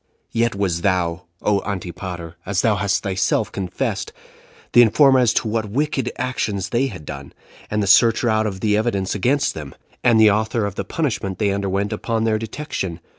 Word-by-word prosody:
"Yet 115 -1 +1
wast 95 -4 -1
thou, 90 -2 0 0.2
O 100 -1 +2
Antipater! 90 -3 -6
[as 100 -1 -1
thou 110 -2 +3
hast 100 -3 0
thyself 95 -1 0
confessed,] 95 -2 -3 0.6
the 120 - +8
informer 130 +3 +5
as 120 -3 +4
to - - +1
what 110 -1 -1
wicked 135 0 -1
actions 105 -6 -2
they 125 +3 +1
had 90 - -9
done, 70 -1 -8 0.4
and 105 0 0
the - - 0
searcher 115 +5 +5
out 110 -1 +2
of 95 -2 -5
the 105 -1 +2
evidence 105 -4 0
against 130 +8 +1
them, 75 -3 -8 0.3
and 115 -2 +5
the 110 -1 +7
author 110 +1 0
of 100 - -3
the 100 - -3
punishment 110 - -2
they 105 -1 +1
underwent 100 0 -1
upon 115 -1 -2
their 110 -1 +1
detection. 110 - -5
105 Hz, 180 wpm, -21 LUFS, 95-115 Hz, 0.6 s, the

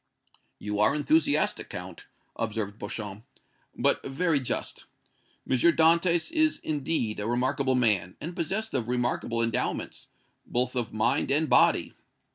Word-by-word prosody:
"You 105 0 -4
are 105 +7 +4
enthusiastic, 150 0 +1
Count," - - -8 0.3
observed 110 -2 -3
Beauchamp, 105 0 -6 0.5
"but - - +1
very 150 +3 0
just. 130 - -4 0.6
M. - - +2
Dantès 170 - +3
is, 315 -1 +2
indeed, 140 -7 -1
a 105 - -3
remarkable 130 +2 +1
man, 105 -8 +1
and 170 +3 -6
possessed 195 +6 -2
of 115 - -1
remarkable 120 -1 -1
endowments, 115 -1 -2 0.4
both 125 +1 -1
of 120 -3 -2
mind 110 0 0
and 155 +3 +2
body. - - +3
130 Hz, 125 wpm, -27 LUFS, 110-160 Hz, 0.6 s, are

